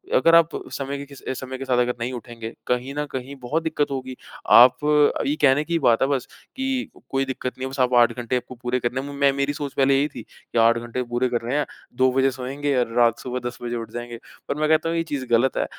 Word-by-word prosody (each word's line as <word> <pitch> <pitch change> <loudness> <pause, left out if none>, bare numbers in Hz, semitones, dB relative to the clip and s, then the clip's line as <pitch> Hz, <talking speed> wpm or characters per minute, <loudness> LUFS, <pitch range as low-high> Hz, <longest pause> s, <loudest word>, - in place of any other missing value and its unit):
अगर 165 0 +5
आप 165 -1 +6 0.2
समय 140 +1 -3
के 140 - -7
किस 140 -1 -14
अ, - - -4
समय 130 0 -6
के 135 - -6
साथ 130 -2 +1
अगर 125 0 +1
नहीं 120 +2 -2
उठेंगे, 115 -2 -7
कहीं 125 +2 -1
न 150 0 -1
कहीं 130 +2 -5
बहुत 150 +7 -1
दिक्कत 155 -3 -1
होगी। 130 -1 -4 0.4
आप 125 +1 +8 0.5
ये 145 - +1
कहने 145 0 +4
की 170 0 0
बात 120 -6 +3
है 135 - +3
बस 135 -3 -1 0.3
कि 265 -1 -2 0.2
कोई 135 0 0
दिक्कत 130 -1 -4
नहीं 130 - -4
होगी, 130 - -5
बस 135 - -6
आप 125 -1 +2
8 120 - +4
घंटे 120 +1 -2
आपको 125 +1 -7
पूरे 125 +1 -2
करने 125 +2 -2
में, 145 +1 -7
मैं 140 0 +3
मेरी 140 +1 -1
सोच 145 -2 -5
पहले 135 0 +3
यही 140 +2 +2
थी - - -7
कि - - -10
8 115 +1 +5
घंटे 120 +2 -4
पूरे 125 +1 +1
करने 120 +2 -2
हैं, 150 - +1 0.3
2 130 +1 +3
बजे 135 +1 +2
सोएँगे 135 +3 -3
और 115 - -9
रात 115 -1 +4
सुबह 125 0 -4
10 120 - -13
बजे 120 0 -3
उठ 115 -1 -6
जाएँगे, 120 -1 -6 0.3
पर - - -1
मैं 155 0 +1
कहता 160 +1 +3
हूँ 165 - -1
यह 165 - +1
चीज़ 145 -4 -3
गलत 120 +3 +2
है। - - +1
130 Hz, 260 wpm, -23 LUFS, 120-140 Hz, 0.5 s, आप